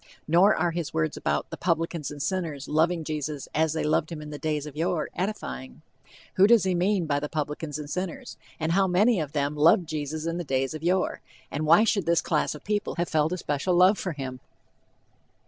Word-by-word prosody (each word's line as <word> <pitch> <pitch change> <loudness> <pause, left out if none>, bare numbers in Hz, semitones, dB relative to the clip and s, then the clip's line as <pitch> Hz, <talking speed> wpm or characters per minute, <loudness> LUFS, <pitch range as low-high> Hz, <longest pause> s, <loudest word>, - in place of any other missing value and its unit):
Nor 175 +6 +5
are 175 - +1
his 170 -2 -4
words 80 0 0
about 75 0 -2
"the - - -5
publicans 165 -3 -1
and 145 - -8
sinners 160 -4 -3
loving 165 +2 +1
Jesus 150 -2 -4
as 160 0 +2
they 160 - -1
loved 155 +1 +1
him 165 - -5
in 150 0 -8
the 145 - -7
days 150 -2 -2
of 150 -2 -9
yore" 165 0 -1
edifying. 65 - -5 0.5
Who 190 +2 +7
does 235 -2 +5
he 190 -1 +1
mean 180 +1 +1
by 145 -2 0
the 150 0 -4
"publicans 150 -1 -3
and 150 -1 -6
sinners," 180 +2 -5 0.2
and 160 0 -1
how 190 +2 +3
many 200 +4 +3
of 150 -3 -4
them 145 0 -1
loved 165 +4 +4
Jesus 155 0 -4
in 165 +1 -2
the - - -2
days 135 -2 -1
of 155 - -6
yore, 180 +3 0 0.3
and 150 +2 -2
why 170 +7 +7
should 200 -6 +1
this 170 -1 +3
class 150 -1 0
of 150 - -11
people 210 0 -2
have 175 0 -1
felt 155 +1 +1
a - - -2
special 155 +2 -1
love 185 +4 +5
for 185 - -3
him? 130 -3 -6
160 Hz, 215 wpm, -26 LUFS, 150-180 Hz, 0.5 s, Who